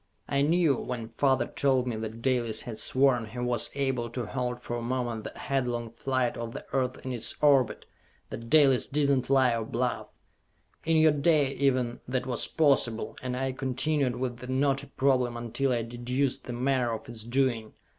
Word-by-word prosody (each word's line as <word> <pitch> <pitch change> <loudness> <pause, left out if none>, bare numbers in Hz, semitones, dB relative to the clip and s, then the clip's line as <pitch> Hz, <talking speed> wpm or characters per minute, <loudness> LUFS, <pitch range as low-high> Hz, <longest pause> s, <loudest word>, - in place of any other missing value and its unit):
I 140 - +1
knew, 155 -2 +3
when 115 -3 -5
father 130 +1 +1
told 130 -1 +1
me 120 -3 -2
that 110 +1 -6
Dalis 120 -4 +1
had 110 -3 -6
sworn 130 -2 +2
he 110 +4 -11
was 120 -1 0
able 130 -4 -1
to 120 0 -4
halt 125 +2 -3
for 120 -1 -5
a - - -4
moment 120 -2 -2
the - - -8
headlong 120 -4 -2
flight 130 +1 -1
of 115 0 -5
the - - -7
Earth 130 -1 -1
in 130 - -3
its 120 - -1
orbit, 140 -5 +3 0.5
that 115 0 -7
Dalis 140 -5 +5
did 145 0 +1
not 130 -2 0
lie 130 -3 +4
or 115 - -2
bluff! 120 +2 -2 0.8
In 165 0 +3
your 155 0 +6
day, 145 -2 +2
even, 130 -4 0
that 130 0 -1
was 125 -2 -1
possible, 135 -8 +1
and 125 -1 -3
I 135 0 -1
continued 130 +1 0
with 125 -1 -3
the 125 +1 -9
knotty 135 +1 0
problem 130 -3 +1
until 120 +3 -1
I 120 -2 0
deduced 125 +3 -2
the 125 - -5
manner 125 0 0
of 110 - -6
its 115 -2 -7
doing. 120 -2 0
125 Hz, 185 wpm, -28 LUFS, 120-135 Hz, 0.8 s, your